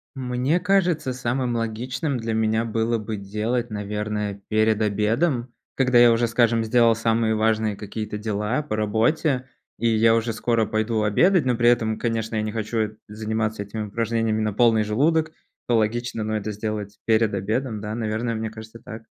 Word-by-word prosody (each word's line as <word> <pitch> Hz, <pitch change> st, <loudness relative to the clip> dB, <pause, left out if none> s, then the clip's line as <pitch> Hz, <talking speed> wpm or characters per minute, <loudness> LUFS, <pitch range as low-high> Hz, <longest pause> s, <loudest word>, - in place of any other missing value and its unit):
Мне 130 Hz, +5 st, 0 dB
кажется, 180 Hz, -8 st, +1 dB
самым 125 Hz, 0 st, -1 dB
логичным 125 Hz, +5 st, -2 dB
для 115 Hz, -1 st, -2 dB
меня 110 Hz, +1 st, +1 dB
было 115 Hz, +1 st, 0 dB
бы 110 Hz, 0 st, -5 dB
делать, 110 Hz, +4 st, -2 dB
наверное, 105 Hz, 0 st, -3 dB
перед 110 Hz, 0 st, +2 dB
обедом, 120 Hz, +5 st, 0 dB, 0.2 s
когда 125 Hz, -2 st, +2 dB
я 120 Hz, -1 st, +8 dB
уже, 115 Hz, +1 st, +2 dB
скажем, 115 Hz, -1 st, +2 dB
сделал 115 Hz, 0 st, +4 dB
самые 115 Hz, 0 st, +1 dB
важные 110 Hz, -1 st, +1 dB
какие-то 105 Hz, +1 st, -5 dB
дела 105 Hz, +5 st, -1 dB
по 145 Hz, -7 st, -4 dB
работе, 125 Hz, +5 st, +1 dB, 0.3 s
и 115 Hz, -, +1 dB
я 115 Hz, 0 st, +4 dB
уже 115 Hz, 0 st, +1 dB
скоро 115 Hz, -1 st, 0 dB
пойду 110 Hz, 0 st, 0 dB
обедать, 165 Hz, -, +3 dB
но 125 Hz, -2 st, +2 dB
при 120 Hz, 0 st, +2 dB
этом, 110 Hz, -2 st, +1 dB
конечно, 115 Hz, -1 st, -2 dB
я 110 Hz, -, 0 dB
не 110 Hz, -, -3 dB
хочу 110 Hz, -1 st, -2 dB
заниматься 110 Hz, 0 st, -2 dB
этими 105 Hz, +1 st, -5 dB
упражнениями 115 Hz, 0 st, -1 dB
на 105 Hz, -2 st, -1 dB
полный 110 Hz, -1 st, +4 dB
желудок, 155 Hz, +9 st, +1 dB, 0.4 s
то 120 Hz, -2 st, +3 dB
логично, 115 Hz, +1 st, -1 dB
но 110 Hz, 0 st, -1 dB
это 105 Hz, +1 st, -4 dB
сделать 105 Hz, 0 st, -5 dB
перед 110 Hz, -2 st, +2 dB
обедом, 110 Hz, +3 st, -2 dB
да, 105 Hz, +1 st, -4 dB
наверное, 115 Hz, +1 st, -2 dB
мне 110 Hz, 0 st, -3 dB
кажется 110 Hz, +1 st, -11 dB
так. 110 Hz, +1 st, -10 dB
110 Hz, 170 wpm, -23 LUFS, 110-120 Hz, 0.4 s, я